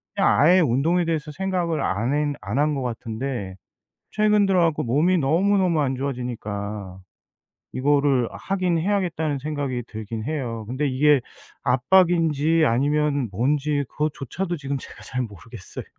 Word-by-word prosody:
그냥 195 - +3 0.3
아예 - - +6
운동에 165 +6 +2
대해서 160 -2 -2
생각을 175 -2 -1
안 115 +8 0
핸 150 -1 0
안 105 +5 -3
한 150 0 +2
것 135 - -2
같은데 115 -4 -4 0.6
최근 210 -1 +3
들어 185 -2 +3
갖고 165 -3 +1
몸이 155 +10 +2
너무너무 175 +2 +2
안 135 -2 0
좋아지니까 105 -7 -5 0.7
이거를 140 -2 +2
하긴 185 -3 -1
해야겠다는 165 -6 -1
생각이 140 -4 -3
들긴 110 0 -6
해요. 125 -7 -3
근데 135 +4 -1
이게 140 +1 +4 0.4
압박인지 165 +2 +3
아니면 145 +1 +1
뭔지 145 +6 0
그것조차도 155 +4 -3
지금 140 -1 -3
제가 - - -12
잘 125 +1 -3
모르겠어요. 115 -1 -9
145 Hz, 315 characters per minute, -23 LUFS, 125-165 Hz, 0.7 s, 아예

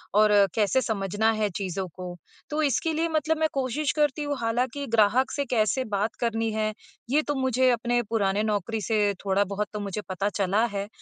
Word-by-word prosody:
और 210 0 +5 0.2
कैसे 220 +4 +2
समझना 210 -1 0
है 210 - +2
चीज़ों 190 -1 -3
को। 180 -1 -6 0.3
तो 300 +1 -1
इसके 305 +3 +1
लिए 325 +2 0
मतलब 315 0 +1
मैं 315 0 +2
कोशिश 270 +2 0
करती 295 0 +2
हूँ, 290 -1 -2
हालाँकि 245 +5 -1
ग्राहक 230 +3 +3
से 285 - -2
कैसे 240 +1 +1
बात 215 +3 -1
करनी 225 -1 0
है, 215 0 -1 0.4
ये 290 +4 +3
तो 290 -1 -2
मुझे 260 -1 +2
अपने 240 +1 +1
पुराने 205 -2 +1
नौकरी 215 +1 -1
से 210 -1 +1
थोड़ा-बहुत 200 +1 0
तो 210 - -3
मुझे 205 0 -4
पता 190 +2 -1
चला 205 +2 +1
है 200 +1 -3
225 Hz, 185 wpm, -26 LUFS, 205-260 Hz, 0.4 s, और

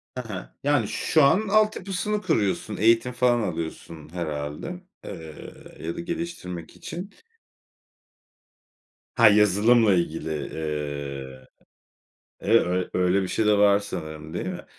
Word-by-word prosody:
Ha 125 - -4
ha. 95 -3 -7
Yani, 140 -7 +2
şu 155 -3 +2
an 200 +10 +4
altyapısını 210 -1 +1
kuruyorsun, 100 - 0
eğitim 115 +3 +3
falan 125 -1 +3
alıyorsun 80 -4 -5
herhâlde, 80 - -4 0.2
eee, 80 -5 -10
ya 80 +1 -4
da - - -6
geliştirmek 170 - -5
için. 180 +4 -7 2.1
Ha, 115 -2 +7
yazılımla 105 +2 +5
ilgili, 80 -3 -1
eee, 70 -4 -5 0.9
eve 115 +3 +4
ö 90 +1 -1
öyle 90 +2 +2
bir - - -3
şey 110 - 0
de 105 -1 +4
var 100 0 +5
sanırım 80 -5 -7
değil 85 - -3
mi? 90 -1 -6
100 Hz, 120 wpm, -25 LUFS, 80-125 Hz, 2.1 s, Ha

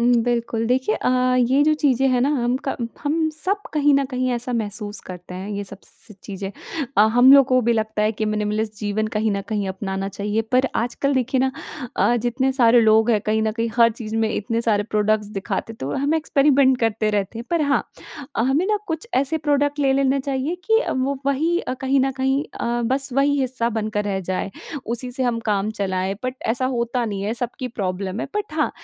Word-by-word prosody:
उम, 245 +1 +4
बिल्कुल 235 -1 -1
देखिए 250 -2 +1
अ, - - -1 0.3
ये 260 +3 +3
जो 310 +1 +4
चीज़ें 270 -3 +3
हैं 250 -1 +2
ना 265 - +2
हम 250 -4 +1
क 270 - -1 0.3
हम 315 +2 +1
सब 370 +6 -2
कहीं 295 -1 +3
न 275 0 +3
कहीं 255 0 -1
ऐसा 245 +1 -3
महसूस 210 -2 -3
करते 180 0 -10
हैं 190 +3 -6
ये 205 0 -3
सब 200 0 -10
स 215 - -14
चीज़ें 195 -1 -5 0.5
अ, - - +6
हम 250 +2 +8
लोग 275 -2 +8
को 255 -1 +3
भी 235 +1 +2
लगता 220 -1 -1
है 215 +1 +2
कि 215 0 -3
मिनिमलिस्ट 215 0 -1
जीवन 210 +1 -1
कहीं 215 +1 +1
न 200 - -1
कहीं 205 -3 -1
अपनाना 190 0 -3
चाहिए, 205 +2 -2
पर 255 +4 +1
आजकल 245 +4 0
देखिए 260 0 +1
ना 265 0 +2 0.5
अ, 240 - +3
जितने 245 +3 0
सारे 240 -2 +5
लोग 220 +1 +4
हैं 215 - +3
कहीं 220 +1 +1
न 220 0 0
कहीं 230 +1 -1
हर 230 -1 +6
चीज़ 220 -1 -6
में 225 0 +2
इतने 230 +2 -1
सारे 215 -3 +1
प्रोडक्ट्स 210 0 +1
दिखाते, 205 +2 -4
तो 135 -11 -7
वो - - -3
हम 285 +3 +1
एक्सपेरिमेंट 280 -4 +3
करते 220 -1 +1
रहते 205 +1 -2
हैं। 235 - -6
पर 335 -3 +2
हाँ 285 -1 +2 0.5
अ, - - +2
हमें 275 +9 +2
ना 420 0 +1
कुछ 325 +7 -4
ऐसे 280 +4 +1
प्रोडक्ट 290 0 +2
ले 275 -2 +3
लेने 275 0 +2
चाहिए, 275 +4 -2
कि 445 0 +4
अ, - - -2
वो 265 +1 -1
वही 315 +5 +1
अ, 255 - -4
कहीं 270 +1 +2
न 270 +1 +2
कहीं 265 +1 0 0.2
अ, 240 0 -1
बस 270 +2 0
वही 285 +2 +2
हिस्सा 255 -3 0
बनकर 210 -1 -2
रह 195 -2 -1
जाए। 185 +1 -2 0.4
उसी 240 +2 -3
से 260 - -2
हम 240 -2 0
काम 205 +1 0
चलाएँ 190 -2 -2
बट 255 - -2
ऐसा 245 +3 +1
होता 235 +1 -1
नहीं 200 -3 -3
है, 215 +3 -1
सबकी 245 +2 -4
प्रॉब्लम 195 -2 -3
है - - -3
बट 420 -5 -3
हाँ, 305 -1 +1
240 Hz, 220 wpm, -22 LUFS, 215-270 Hz, 0.5 s, हम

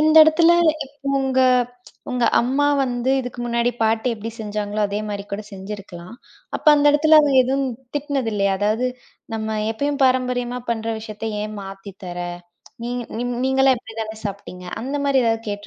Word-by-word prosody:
இந்த 310 0 +4
இடத்துல 330 +2 +5 0.3
இப் 280 +1 -9
உங்க, 265 -1 0 0.7
உங்க 250 -1 0 0.2
அம்மா 270 +4 +1 0.2
வந்து 250 +1 0
இதுக்கு 245 -1 -7
முன்னாடி 235 0 +1
பாட்டி 220 +2 +1
எப்டி 220 +2 -6
செஞ்சாங்களோ, 210 0 -3
அதே 205 +1 -2
மாதிரி 200 -1 -4
கூடச் 210 +1 -5
செஞ்சிருக்கலாம். 195 -1 -8 0.4
அப்போ 305 - +2
அந்த 290 0 +3
இடத்துல 310 +1 +6
அவுங்க 290 -2 +2
எதுவும் 270 +2 0 0.3
திட்டினதில்லயா? 225 -9 0
அதாவது 220 +5 +1 0.5
நம்ம 220 0 -2
எப்பயும் 285 +5 -2
பாரம்பரியமா 250 -1 +1
பண்ற 225 -1 -2
விஷயத்த 220 0 -5
ஏன் 215 0 -5
மாத்தி 195 +1 -9
தர? 175 0 -6 0.7
நீங் 245 +1 -3 0.2
நீம் 245 0 -2
நீங்கல்லாம் 265 -1 +4
இப்டித்தான 220 -1 -7
சாப்பிட்டீங்க? 190 -2 -8 0.2
அந்த 270 +4 -3
மாதிரி 270 -2 +3
ஏதாவது 225 0 +1
கேட்டு 205 0 -6
235 Hz, 155 wpm, -21 LUFS, 210-265 Hz, 0.7 s, இடத்துல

